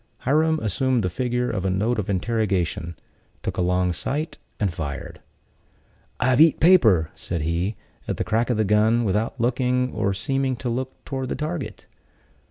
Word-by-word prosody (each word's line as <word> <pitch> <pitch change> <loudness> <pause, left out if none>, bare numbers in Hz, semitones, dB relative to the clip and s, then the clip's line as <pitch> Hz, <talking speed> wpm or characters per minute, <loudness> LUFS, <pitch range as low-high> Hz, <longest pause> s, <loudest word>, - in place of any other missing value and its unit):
Hiram 155 +4 +2
assumed 120 +3 +1
the 90 - -1
figure 125 +2 -1
of 95 -4 -2
a 95 - +1
note 110 +5 0
of 100 - -3
interrogation, 95 -5 -1 0.5
took - - -3
a - - +1
long 90 0 +1
sight, 145 - -3 0.2
and 100 -5 0
fired. 75 -4 -6 1.0
"I've 130 +2 +3
eat 160 -1 +6
paper," 110 - +5
said 85 -3 -4
he, 85 +6 -1 0.3
at - - -2
the - - 0
crack 115 +3 0
of 120 - +1
the 110 - +2
gun, 110 +3 +3
without 110 +5 -1
looking, 125 +1 +1
or 100 0 0
seeming 135 +5 0
to 125 +1 -4
look, 130 +2 -5
toward 130 -2 -3
the - - -1
target. 155 -1 -4
115 Hz, 170 wpm, -24 LUFS, 95-130 Hz, 1.0 s, eat